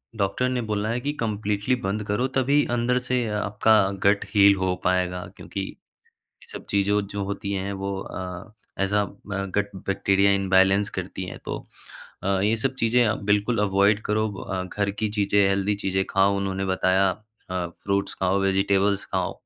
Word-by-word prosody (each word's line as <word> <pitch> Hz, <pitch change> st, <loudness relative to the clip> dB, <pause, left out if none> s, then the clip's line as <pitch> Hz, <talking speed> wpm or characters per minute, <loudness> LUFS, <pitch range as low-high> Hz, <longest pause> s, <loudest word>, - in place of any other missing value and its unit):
Doctor 110 Hz, +5 st, 0 dB
ने 125 Hz, -1 st, -1 dB
बोला 105 Hz, -1 st, -2 dB
है 120 Hz, +2 st, 0 dB
कि 145 Hz, +3 st, -1 dB
कंप्लीटली 105 Hz, +1 st, 0 dB
बंद 100 Hz, +2 st, -1 dB
करो 105 Hz, +6 st, +1 dB
तभी 140 Hz, +3 st, +3 dB
अंदर 120 Hz, +1 st, +1 dB
से 125 Hz, -1 st, -1 dB
आपका 105 Hz, +1 st, +2 dB, 0.3 s
गट 100 Hz, +1 st, +3 dB
हील 100 Hz, -1 st, +6 dB
हो 95 Hz, -1 st, 0 dB
पाएगा, 90 Hz, -1 st, 0 dB
क्योंकि -, -, -6 dB
ये -, -, -10 dB, 0.6 s
सब -, -, -8 dB
चीज़ों 100 Hz, +1 st, +2 dB
जो 100 Hz, -1 st, -3 dB
होती 100 Hz, +1 st, -4 dB
हैं 100 Hz, +1 st, -2 dB
वो 100 Hz, 0 st, -3 dB
अ, 90 Hz, +2 st, -7 dB, 0.3 s
ऐज़ 100 Hz, +1 st, 0 dB
अ, 105 Hz, -, +4 dB, 0.2 s
ब 100 Hz, -1 st, -2 dB
गट 100 Hz, -1 st, -1 dB
बैक्टीरिया 100 Hz, 0 st, +3 dB
इम्बैलेंस 95 Hz, +1 st, +3 dB
करती 95 Hz, 0 st, -5 dB
हैं 90 Hz, -, -8 dB
तो -, -, -3 dB, 0.7 s
अ, -, -, -2 dB, 0.2 s
ये 110 Hz, +2 st, +3 dB
सब 130 Hz, +4 st, -1 dB
चीज़ें 120 Hz, +2 st, +3 dB
आप 110 Hz, -, +1 dB
बिल्कुल 105 Hz, +3 st, +1 dB
अवॉइड 100 Hz, +1 st, +3 dB
करो। 110 Hz, +1 st, +1 dB
अ, 95 Hz, -1 st, -4 dB
घर 100 Hz, +2 st, -2 dB
की 105 Hz, +2 st, -2 dB
चीज़ें 100 Hz, -1 st, +1 dB
हेल्दी 100 Hz, +1 st, +1 dB
चीज़ें 95 Hz, -1 st, -1 dB
खाओ, 95 Hz, +1 st, +3 dB
उन्होंने 95 Hz, 0 st, -2 dB
बताया 95 Hz, 0 st, +2 dB, 0.4 s
अ, 90 Hz, -1 st, -2 dB, 0.2 s
फ्रूट्स 100 Hz, 0 st, 0 dB
खाओ, 95 Hz, +1 st, +1 dB
वेजिटेबल्स 100 Hz, +1 st, +2 dB
खाओ, -, -, 0 dB
100 Hz, 175 wpm, -24 LUFS, 95-105 Hz, 0.7 s, हील